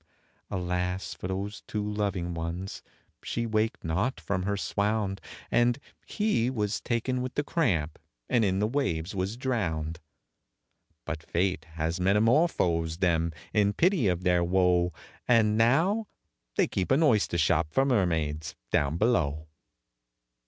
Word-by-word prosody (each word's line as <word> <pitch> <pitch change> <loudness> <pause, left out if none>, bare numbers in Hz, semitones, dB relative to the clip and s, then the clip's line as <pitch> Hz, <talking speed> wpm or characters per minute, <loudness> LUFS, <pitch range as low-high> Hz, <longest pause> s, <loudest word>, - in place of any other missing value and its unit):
Alas 90 0 -2
for - - -6
those 100 +3 -4
two 105 -1 -2
loving 100 -4 -2
ones! 85 +3 -4 0.4
she 115 - -2
waked 110 0 0
not 95 +11 -1
from 95 -2 -2
her 100 +2 -1
swound, 100 -1 -1 0.3
And 120 +1 +3 0.3
he 210 - +1
was 105 -5 -1
taken 125 +2 -1
with 130 0 -4
the 145 - +1
cramp, 90 - 0 0.3
and 120 - +2
in 95 -2 +1
the 105 - +2
waves 105 - -1
was 95 +4 -2
drowned; 85 -12 -2 1.1
But 80 -1 -4
Fate 85 -1 -1
has 80 +2 -2
metamorphosed 95 - +2
them, 85 -3 +2 0.2
in 105 -1 +3
pity 170 - +3
of 90 -1 0
their 90 -1 +3
woe, 90 -1 +3 0.4
And 110 -3 +4
now 165 - +3 0.5
they - - +4
keep 95 - -2
an 135 +5 +4
oyster 110 - +3
shop 80 -1 +2
for 135 +11 +3
mermaids 80 - 0 0.2
down 75 +2 +1
below. 80 -9 +1
95 Hz, 135 wpm, -28 LUFS, 85-115 Hz, 1.1 s, And